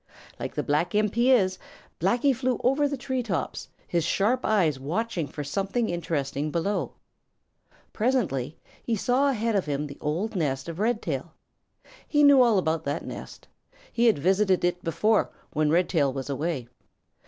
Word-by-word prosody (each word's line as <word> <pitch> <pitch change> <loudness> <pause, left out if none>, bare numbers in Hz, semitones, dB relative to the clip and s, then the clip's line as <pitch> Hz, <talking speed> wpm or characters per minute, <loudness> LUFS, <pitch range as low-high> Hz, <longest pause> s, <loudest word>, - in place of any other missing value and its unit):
Like - - -5
the - - -1
black 160 +6 0
imp 210 -1 +2
he 240 +2 +3
is, 190 -7 +3 0.4
Blacky 240 - +2
flew 255 0 -1
over 270 +4 +3
the 280 -1 -3
tree 260 0 -2
tops, 200 -8 -3 0.2
his 170 -2 0
sharp 215 +9 +1
eyes 170 -10 +2
watching 170 +3 -2
for 145 +1 -6
something 195 - -1
interesting 155 -4 -2
below. 170 +6 -1 1.0
Presently 195 - 0 0.2
he 230 - -1
saw 255 +6 +2
ahead 230 -3 0
of 190 -5 0
him 145 0 -1
the 140 -1 -9
old 175 +9 -2
nest 135 -6 -1
of 165 +1 -6
Red 225 +1 0
tail. 155 +1 -4 0.7
He 295 -1 +3
knew 285 -2 +7
all 235 -4 +4
about 160 -3 0
that 145 +3 -2
nest. - - -9 0.5
He 235 0 +3
had 225 - +4
visited 190 +3 +2
it 175 0 -1
before 205 +7 +2 0.2
when 155 0 +2
Red 175 +3 +3
tail 145 -6 +2
was 135 +1 -5
away. 145 -3 -2
185 Hz, 165 wpm, -26 LUFS, 155-230 Hz, 1.0 s, knew